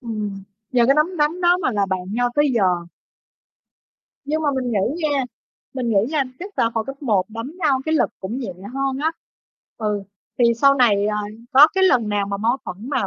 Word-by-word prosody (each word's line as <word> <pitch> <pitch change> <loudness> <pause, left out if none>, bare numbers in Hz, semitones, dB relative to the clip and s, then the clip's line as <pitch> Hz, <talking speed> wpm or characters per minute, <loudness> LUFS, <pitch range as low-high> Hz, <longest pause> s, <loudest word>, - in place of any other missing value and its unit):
Ừm, 210 -5 -5 0.3
nhờ 245 -2 +4
cái 275 - +5
nắm 315 +5 +1
đấm 310 +4 0
đó 350 0 +4
mà - - +1
là 200 -2 +1
bạn 190 -1 -2
nhau 245 +1 +1
tới 295 -1 +3
giờ. 225 - +2 1.6
Nhưng 310 +2 -1
mà 295 - +1
mình 255 -2 -2
nghĩ 235 - -1
nha, 275 -2 +1 0.5
mình 255 -3 -2
nghĩ 220 - +1
nha, 305 -3 +1 0.2
chắc 395 +3 -9
là 230 - +2
hồi 225 -1 -1
cấp 270 +2 -8
1 210 -8 +2
đánh 230 +6 -7
nhau 290 -7 +2
cái 315 - 0
lực - - +2
cũng 210 +7 -4
nhẹ 230 -8 -5 0.2
hơn 270 0 -1
á. 320 - +2 0.7
Ừ, 210 -3 -2 0.4
thì 245 - +4
sau 275 +4 +4
này, 210 -6 +3
à, 210 - -1 0.4
có 285 +3 +8
cái 380 0 +3
lần 245 - +3
nào 205 -1 0
mà 200 - -3
mâu 230 +5 +1
thuẫn 200 +9 -7
mà 200 -8 0
250 Hz, 210 wpm, -21 LUFS, 210-290 Hz, 1.6 s, có